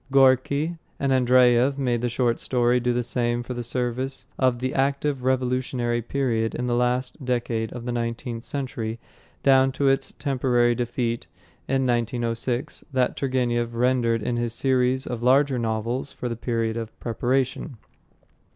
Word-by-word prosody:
Gorky 140 +5 +3 0.2
and 140 -1 +1
Andreyev 125 +1 +4
made 125 -4 0
the 120 - 0
short 120 -1 0
story 125 -1 +2
do 125 0 0
the 120 0 0
same 120 0 -1
service 125 +2 -3
for 130 -1 +3
the 130 +2 -3
active 140 0 0
revolutionary 125 -2 0
period 115 -3 -1
in 125 - -2
the 120 - 0
last 125 +3 0
decade 120 -3 -1
of 120 -1 -7
the 120 - -2
nineteenth 115 0 -3
century 120 -5 -3 0.5
down 135 -1 +5
to 140 +1 +1
its 135 - 0
temporary 125 -4 +2
defeat 120 0 -2 0.4
in 135 0 +1
1906 120 +1 -1
that 130 -2 +1
Turgenev 120 -3 0
rendered 120 -2 +2
in 120 +1 -1
his 120 -1 -2
series 130 -1 +1
of 120 -2 -4
larger 130 +1 +3
novels 115 +4 -2
for 125 - -5
the 115 - -3
period 115 -1 -1
of 115 0 -6
preparation. 130 +3 -1
125 Hz, 145 wpm, -24 LUFS, 120-130 Hz, 0.5 s, down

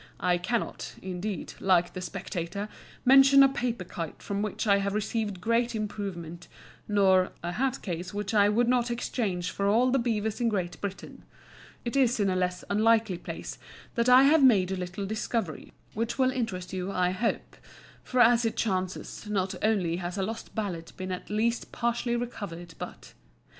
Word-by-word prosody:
I 180 -1 +2
cannot, 225 +6 -3
indeed, 190 0 -4
like 180 -2 +3
the 185 - -5
"Spectator," 190 +2 -4 0.4
"mention 270 +1 +8
a - - +8
paper 240 -6 -2
kite 170 -3 -7
from 200 0 -2
which 210 +1 -2
I 200 -2 +5
have 200 +1 -1
received 215 -2 -2
great 230 +4 +1
improvement," 190 -6 -5 0.4
nor 190 -3 +3
"a 175 - -2
hat 265 +6 -1
case 175 -1 -4
which 205 0 -3
I 205 -1 +5
would 235 +3 +2
not 245 -1 +2
exchange 205 -7 -2
for 200 - -1
all 240 +5 +4
the 270 - +3
beavers 220 -1 -1
in 235 - +3
Great 185 -5 -3
Britain." 200 -1 -6 0.6
It 235 - -3
is 255 -3 +3
in 200 -2 +2
a - - 0
less 180 0 -1
unlikely 220 -3 +2
place - - -7 0.3
that 235 +1 +1
I 255 +1 +8
have 300 +3 +5
made 195 -8 +5
a - - 0
little 180 +2 -4
discovery 215 - -3 0.2
which 230 +2 -2
will 260 -1 +3
interest 215 -9 -3
you, 185 +1 -3
I 180 -1 +1
hope; 220 +5 -2 0.5
for 255 -1 +1
as 240 0 +6
it 225 - -1
chances, 185 0 -2
not 190 -2 0
only 190 -6 +1
has 180 +1 -4
a 195 - 0
lost 225 +3 -6
ballad 180 -6 -4
been 185 0 -4
at 180 - -5
least 230 +3 0
partially 235 0 -1
recovered, 195 -8 -5
but - - -8
205 Hz, 175 wpm, -28 LUFS, 185-235 Hz, 0.6 s, mention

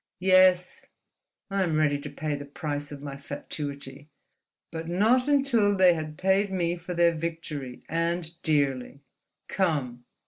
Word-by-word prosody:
Yes; 185 -1 +4 0.6
I 195 0 0
am 170 -4 0
ready 150 -2 +2
to - - -7
pay 155 -1 -3
the 145 0 -4
price 145 0 -5
of 145 -1 -9
my 140 -1 -6
fatuity—but 145 +3 -8
not 225 +9 +3
until 260 -8 +3
they 185 -2 +6
had 155 -2 -5
paid 190 +1 +2
me 175 -2 0
for 175 +1 -7
their 170 0 +4
victory—and 165 +1 -4
dearly. 140 -3 0 0.5
Come!" 140 -10 -1
165 Hz, 130 wpm, -27 LUFS, 145-185 Hz, 0.6 s, they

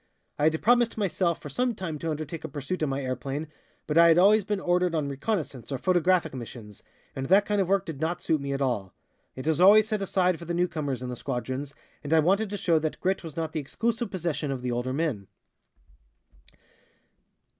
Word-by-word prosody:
I 145 - +2
had 160 0 +2
promised 240 0 +3
myself 185 -4 0
for 145 - -8
some 245 - 0
time 165 -6 -5
to 165 - -3
undertake 155 +1 -5
a - - -3
pursuit 145 +6 -4
in 155 - +1
my 135 +1 -2
airplane, 135 +4 -3 0.4
but 150 +2 +2
I 170 - +8
had 165 0 +5
always 205 +4 +6
been 205 0 -2
ordered 180 -1 +1
on 150 -3 0
reconnaissances 140 - -3
or 135 - -1
photographic 180 0 +2
missions, 115 -4 -9 0.3
and 135 0 -3
that 195 +3 +5
kind 205 -1 +1
of 190 - 0
work 195 0 +2
did 155 -3 -7
not 165 +2 -1
suit 155 -3 0
me 140 0 -3
at 140 0 -1
all. 105 -8 -2 0.4
It 130 - -7
is 160 +2 +1
always 210 +3 +7
set 215 -2 -2
aside 185 -2 +1
for 170 - -9
the 170 +1 -3
newcomers 155 -8 -1
in 125 - -4
the 125 - -4
squadrons, 130 +2 -4 0.3
and 145 +2 -1
I 160 - +6
wanted 195 +7 +2
to 205 - -4
show 170 -4 +2
that 155 0 -3
grit 190 0 0
was 160 -3 -9
not 160 -1 -2
the 160 - -1
exclusive 230 - -2
possession 165 -6 -2
of 130 -2 -4
the 125 - -1
older 120 +2 -2
men." 135 - -2
160 Hz, 215 wpm, -27 LUFS, 140-185 Hz, 0.4 s, I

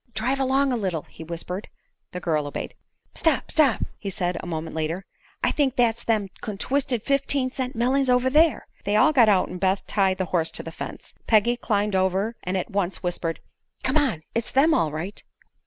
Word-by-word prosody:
"Drive 255 +5 0
along 270 0 +2
a - - +1
little," 185 -7 -2
he - - -12
whispered. 170 +4 -4 0.4
The 180 - -5
girl 155 -4 0
obeyed. 145 - -5 0.4
"Stop 320 -5 +1
stop!" 290 -6 +3 0.3
said 180 -2 -1
he, - - -4
a - - -8
moment 160 -1 -4
later. 160 +4 -2 0.4
"I - - +3
think 275 -4 +1
that's 235 -1 +2
them 215 -4 0
contwisted 245 +3 -1
fifteen 275 -1 +1
cent 255 -1 -4
mellings 260 +3 +2
over 250 +1 +3
there!" 310 +4 +3 0.2
They 205 - 0
all 310 +9 +5
got 240 -6 +6
out 190 -3 +3
and 180 - -6
Beth 190 +1 +1
tied 190 -2 +1
the 190 - -1
horse 165 -2 +2
to - - -3
the 165 - -7
fence. - - -8
Peggy 225 +2 +4
climbed 210 -4 0
over 190 +4 +1
and 185 +1 -2
at 185 - -3
once 195 -2 -1
whispered: 170 -2 -2 0.4
"Come 260 - 0
on! 245 - +1
It's 230 -1 -2
them, 300 +5 +4
all 160 -3 +2
right." 170 +7 -5
210 Hz, 195 wpm, -24 LUFS, 180-260 Hz, 0.4 s, got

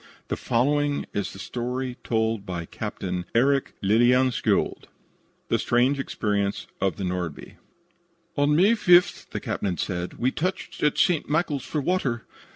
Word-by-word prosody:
The - - 0
following 145 +4 +1
is 100 - -2
the - - -11
story 125 +5 -3
told 110 -2 0
by 90 -3 -5
Captain 90 +1 -4
Eric 135 +3 +2
Lillien 120 +5 +4
skjold: 115 - 0 0.6
THE - - +2
STRANGE 125 +4 +2
EXPERIENCE 100 -6 -1 0.2
OF 95 -4 +1
THE 95 - -5
"NORDBY" 90 -4 -4 0.8
"On 145 +1 +3
May 190 +7 +5
5th," 180 -6 +4
the - - -4
captain 95 -4 -2
said, 90 -2 -3
"we 125 +2 0
touched 185 +7 -3
at 150 - +2
St. 175 -7 +2
Michael's 150 -3 0
for 150 - -2
water. 135 -8 -1
125 Hz, 145 wpm, -25 LUFS, 100-145 Hz, 0.8 s, May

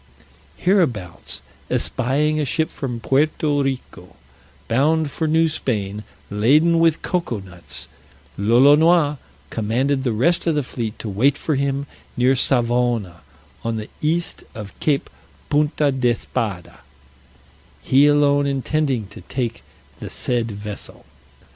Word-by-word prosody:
Hereabouts 130 - 0 0.3
espying 145 +5 +1
a - - +1
ship 155 +4 0
from 120 -4 -4
Puerto 145 +3 +1
Rico, 135 -2 -5 0.5
bound 150 +5 +2
for 160 - -1
New 160 +1 +3
Spain, 105 -9 -2 0.3
laden 150 +11 +4
with 165 -2 +2
cocoa 170 - -1
nuts, 85 -8 -8 0.5
Lolonois 145 - +5 0.3
commanded 130 +5 0
the 125 - 0
rest 170 +12 +1
of 165 - +2
the 150 - +1
fleet 115 -3 -5
to - - -6
wait 115 +8 +2
for 155 - -1
him 140 0 -1 0.3
near 125 +2 +4
Savona, 120 -8 +1 0.4
on 115 -1 -2
the 110 - -7
east 165 +3 -1
of 105 -3 -8
Cape 145 -3 +1 0.4
Punta 150 0 +2
d'Espada, 120 -7 -2 1.0
he 140 +2 +5
alone 145 -1 +3
intending 135 -3 0
to - - -12
take 120 -4 -4 0.4
the - - -6
said 120 -2 -1
vessel. 105 0 -8
135 Hz, 120 wpm, -21 LUFS, 115-150 Hz, 1.0 s, Lolonois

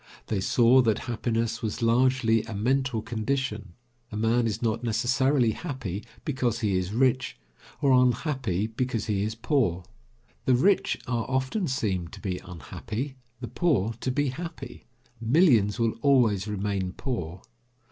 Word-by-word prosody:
They 105 - 0
saw 120 +5 +5
that 110 -4 +2
happiness 115 -1 -2
was 115 +2 -3
largely 115 -1 +3
a 115 -2 -6
mental 125 +1 0
condition. 110 -3 -3 0.4
A 105 - -4
man 115 +2 +2
is 110 0 -2
not 115 0 -1
necessarily 125 +2 +2
happy 115 - -5 0.2
because 125 -5 -1
he 105 -3 +1
is 95 +1 -1
rich, 130 - +1 0.5
or 140 - +4
unhappy 125 - +2
because 115 0 -2
he 100 -3 0
is 110 +2 -2
poor. 115 - 0 0.6
The 130 - +4
rich 190 +10 +2
are 120 -3 -2
often 130 +9 0
seem 95 -9 -1
to - - -11
be 95 -4 -3
unhappy, 110 - -6 0.2
the 120 - -4
poor 115 - +1
to 130 - -2
be 145 +2 +1
happy. 165 +5 -8 0.4
Millions 115 - +4
will 115 -1 +2
always 115 -8 +3
remain 100 -2 -2
poor. 90 -10 -4
115 Hz, 145 wpm, -27 LUFS, 105-130 Hz, 0.6 s, saw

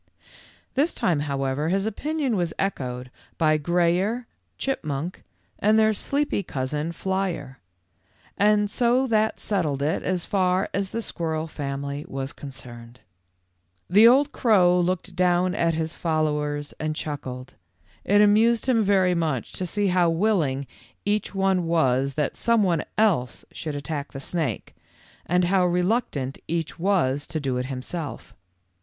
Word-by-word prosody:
This 295 +5 +1
time, 165 -5 +1
however, 140 +1 -1
his 195 +2 +1
opinion 280 +3 -1
was 175 -4 -1
echoed 125 -9 -3 0.3
by 155 -2 +3
Grayer, 175 +9 +1 0.3
Chipmunk, 165 - -3 0.4
and 215 +2 +4
their 220 0 +4
sleepy 285 +2 0
cousin, 150 +1 -3
Flyer; 180 -7 -3 1.1
so 245 +5 +2
that 220 -3 +1
settled 155 -9 -1
it 155 +3 0
as 180 -2 -1
far 185 -1 +1
as 200 -1 -1
the 230 +3 -3
squirrel 160 -4 -2
family 140 -1 -4
was 135 0 -4
concerned. 125 -3 -10 0.9
The 210 +6 +7
old 275 +4 +5
crow 180 -9 +4
looked 180 0 -1
down 180 0 +2
at 170 -4 +1
his 160 +1 -2
followers 150 -2 -1
and 155 0 -2
chuckled. 130 -4 -6 0.5
It 205 +2 +4
amused 220 +3 +4
him 250 -3 +3
very 190 -2 +3
much 155 -8 -1
to 185 - -4
see 205 +2 0
how 180 -2 +3
willing 165 -7 +1 0.4
each 205 0 -1
one 190 -3 +1
was 135 -5 +2
that 150 -2 -1
some 230 -2 +2
one 170 -5 +1
else 190 - +1
should 155 -3 -5
attack 145 +1 -5
the 135 - -5
snake, 140 - -3 0.5
and 180 +1 +2
how 185 +1 +3
reluctant 180 - 0
each 165 0 -3
was 165 -7 +1
to 155 - -3
do 135 -3 -1
it 125 0 -2
himself. 140 +5 -6
170 Hz, 135 wpm, -25 LUFS, 145-200 Hz, 1.1 s, The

